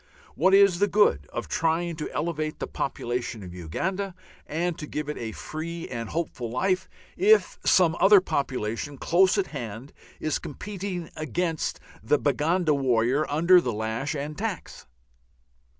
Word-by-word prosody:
What 190 +1 +4
is 195 -3 +5
the 205 - +4
good 185 - +3
of - - -4
trying 165 +1 0
to 150 - -4
elevate 155 -1 -2
the - - -3
population 120 -4 -3
of 90 -1 -9
Uganda 185 - -3 0.3
and 170 +2 -1
to 150 - -6
give 150 0 -4
it 150 - -3
a 115 -1 -4
free 165 +7 -6
and 115 -3 -5
hopeful 155 -8 -3
life 185 +9 0 0.3
if 425 +3 +4
some 170 -3 +4
other 195 +2 +8
population 135 - -2
close 185 +7 +3
at 200 - +2
hand 120 0 -6 0.3
is 155 - -1
competing 185 +1 -6
against 160 +1 -2 0.2
the 150 - +2
Baganda 155 +4 +1
worker 130 +1 +1
under 170 +5 +5
lash 115 +3 -2
and 145 +1 -4
tax? 205 -1 -5
155 Hz, 145 wpm, -26 LUFS, 130-180 Hz, 0.3 s, other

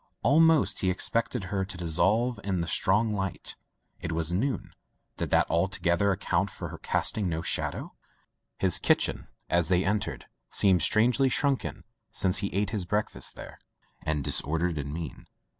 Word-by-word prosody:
Almost 160 +2 +4
he 95 - +1
expected 115 +4 0
her 95 +1 -2
to 95 -1 -7
dissolve 100 +8 +1
in 95 -3 -1
the 85 - -3
strong 105 +6 +2
light. 95 -2 -3 0.4
It 85 -2 -5
was 85 +1 -1
noon; 100 -3 -2 0.5
did - - -3
that - - +3
altogether 85 +2 +1
account 95 0 0
for - - -7
her - - -9
casting 100 -4 0
no 80 0 -3
shadow? - - -2 0.6
His - - +5
kitchen - - +1 0.2
as 85 -2 +1
they 90 +1 +2
entered 100 +1 -2 0.2
seemed 95 -4 +4
strangely 125 - +3
shrunken 140 +1 -1 0.3
since 95 0 +2
he 100 0 -2
ate 100 +1 -1
his 105 -5 -2
break 105 +4 -1
fast - - -2
there, - - -11 0.4
and 75 -2 -2
disordered 80 +4 +2
and 70 0 -5
mean. 80 -3 -7
95 Hz, 160 wpm, -27 LUFS, 85-105 Hz, 0.6 s, His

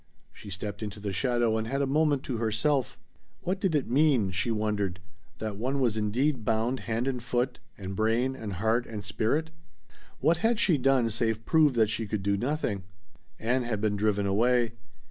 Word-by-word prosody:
She 105 - -11
stepped 100 +2 -5
into 105 -1 -5
the 100 -1 -4
shadow 120 +1 +1
and 110 - -3
had 135 +3 -1
a 140 - +2
moment 145 0 +2
to 125 - -3
herself. 115 +4 0 0.4
What 185 +2 -2
did 185 -6 +1
it 145 - +1
mean 130 -7 +3
she 100 +5 -1
wondered. 105 -4 -1 0.4
That 110 -2 -4
one 130 +5 -1
was 120 -5 +2
indeed 120 +5 0
bound 115 +4 0
hand 115 +3 0
and 130 -2 -1
foot 125 +1 -1 0.2
and 95 -1 -6
brain 115 +5 +1
and 110 -6 -5
heart 110 +6 +1
and 105 -2 -6
spirit? 145 - -1 0.7
What 160 +4 +3
had 225 +4 +2
she 175 -9 +3
done 130 -3 +3
save 115 0 -1
prove 155 -5 +4
that 110 -2 +3
she 110 0 -3
could 100 -1 -2
do 100 +1 +2
nothing? 120 -3 -1 0.6
Ann 125 +3 +1
had 120 -4 -2
been 105 -1 0
driven 105 -1 +1
away. 115 +4 +2
115 Hz, 185 wpm, -28 LUFS, 105-135 Hz, 0.7 s, prove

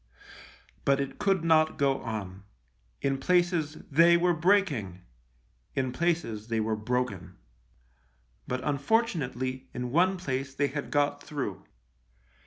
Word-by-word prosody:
But 140 0 +3
it 140 -1 -4
could 195 -4 +1
not 155 -1 +3
go 140 -2 +1
on. 100 -5 -5 0.6
In 135 -1 0
places 175 -1 +1
they 170 +4 +6
were 175 +1 +3
breaking; 155 - +1 0.7
in 130 -1 0
places 125 -8 -1
they 115 -1 0
were 110 0 0
broken; 110 - -3 1.1
but, 125 0 -3
unfortunately, 140 - -1
in 125 0 -3
one 185 +6 +3
place 135 -5 -3
they 140 0 +1
had 145 +2 -5
got 145 0 +1
through. 145 -2 -5
140 Hz, 120 wpm, -28 LUFS, 125-170 Hz, 1.1 s, they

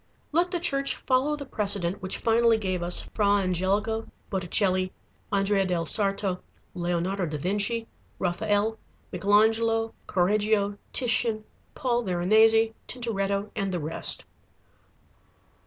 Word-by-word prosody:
Let 340 +4 +2
the 355 -1 -2
Church 275 -5 0
follow 265 +3 +1
the 285 -1 -7
precedent 200 -6 -1
which 185 - -3
finally 230 0 +3
gave 185 -4 -2
us 175 +1 +2
Fra 210 -2 +1
Angelico, 200 +4 0 0.2
Botticelli, 185 0 +1 0.4
Andrea 195 0 +2
del 175 -3 -1
Sarto, 195 0 +1 0.3
Leonardo 175 +1 -1
da 150 0 -4
Vinci, 205 +8 -1 0.3
Raphael, 205 +4 0 0.3
Michelangelo, 225 +4 +2
Correggio, 205 +2 +1
Titian, 230 -3 0 0.3
Paul 245 -3 0
Veronese, 220 +4 +3
Tintoretto, 200 -4 -2
and 195 -3 -2
the 180 - -2
rest. 155 +1 0
205 Hz, 110 wpm, -26 LUFS, 185-225 Hz, 0.4 s, finally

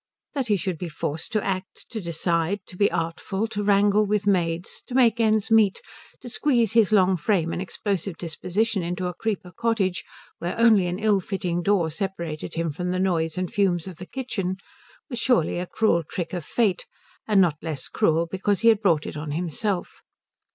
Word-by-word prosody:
That 270 -4 -1
he 210 -2 +3
should 180 -2 -3
be 175 - -4
forced 155 0 -4
to 215 - +1
act, 190 0 -4
to 220 - -4
decide, 170 +2 0
to - - -13
be 200 +2 +3
artful, 165 +5 -2
to 215 -2 -3
wrangle 205 +1 +4
with 210 0 0
maids, 175 -3 0
to 250 - -6
make 235 -3 +4
ends 220 0 +2
meet, 215 -3 +4 0.4
to - - -9
squeeze 240 -3 +2
his 225 -4 +4
long 190 -3 +4
frame 170 -1 +1
and - - -3
explosive 195 -2 -3
disposition 185 +6 -1
into 175 +2 -3
a 180 - -2
Creeper 190 -2 -3
Cottage 220 -6 0 0.4
where 175 - -3
only 220 -6 +5
an 175 +1 -2
ill 210 -1 +3
fitting 180 -2 -2
door 175 -4 +2
separated 170 -3 -4
him 165 -1 -1
from 180 +5 -4
the 180 - 0
noise 170 -4 0
and 180 -1 -3
fumes 185 -4 +1
of 185 -4 -8
the 180 - -9
kitchen, 210 -8 -3 0.5
was 245 -5 -5
surely 230 -10 +2
a 180 - -4
cruel 195 -5 +2
trick 170 +2 -5
of 175 -3 -3
Fate, 205 +1 0 0.4
and 210 -3 +4
not 165 -5 +3
less 155 -5 -4
cruel 165 +1 +2
because 190 +3 -1
he 230 - +6
had 220 -2 +4
brought 165 -7 +2
it - - -6
on 150 0 -5
himself. 180 +5 -3
190 Hz, 195 wpm, -25 LUFS, 170-210 Hz, 0.5 s, he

